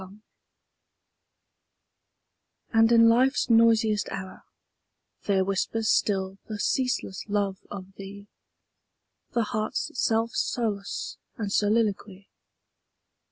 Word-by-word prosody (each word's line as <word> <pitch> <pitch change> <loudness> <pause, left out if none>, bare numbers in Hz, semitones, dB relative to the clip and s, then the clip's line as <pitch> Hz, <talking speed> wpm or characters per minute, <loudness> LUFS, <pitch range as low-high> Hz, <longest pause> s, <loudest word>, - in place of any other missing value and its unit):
25 195 +3 -14 2.5
And 225 0 +5
in 230 -1 +7
Life's 255 +2 +3
noisiest 225 -2 +4
hour 190 -1 -7 0.9
There 190 -2 +2
whispers 215 +3 -1
still 195 -1 0
the 215 - -5
ceaseless 250 -4 -1
love 200 -2 -1
of 195 -1 -9
thee, 200 +1 -9 1.1
The 235 - +2
heart's 215 0 -3
self 225 -1 +1
solace 210 -7 -3
} - - -45
and 210 -4 -3
soliloquy. 205 -2 0
210 Hz, 95 wpm, -26 LUFS, 195-225 Hz, 2.5 s, in